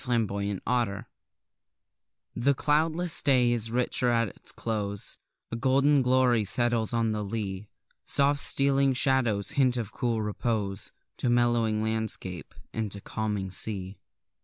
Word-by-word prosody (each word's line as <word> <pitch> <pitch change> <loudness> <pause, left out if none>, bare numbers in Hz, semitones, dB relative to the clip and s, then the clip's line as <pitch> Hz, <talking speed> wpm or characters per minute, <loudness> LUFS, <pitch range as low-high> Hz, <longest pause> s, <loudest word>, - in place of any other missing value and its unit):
Lovecraft 105 0 -1 1.3
The 135 +4 +1
cloudless 160 +4 +1
day 125 -3 +3
is 115 -2 +2
richer 125 +1 0
at 115 -2 +1
its - - -3
close; 100 -3 -2 0.4
A - - -3
golden 135 +4 +3
glory 125 -3 +2
settles 115 +1 +1
on 115 -2 0
the 105 -1 -3
lea; 100 -1 -5 0.3
Soft 140 +1 +2
stealing 140 -1 +3
shadows 120 -7 +2
hint 130 -3 +2
of 110 -4 -4
cool 115 -4 -1
repose 105 -2 -3 0.3
To 125 - -1
mellowing 120 -3 +1
landscape, 110 -5 -1 0.2
and 110 -2 -3
to 100 - +1
calming 105 -2 -4
sea. 95 0 -2
115 Hz, 125 wpm, -27 LUFS, 105-125 Hz, 1.3 s, day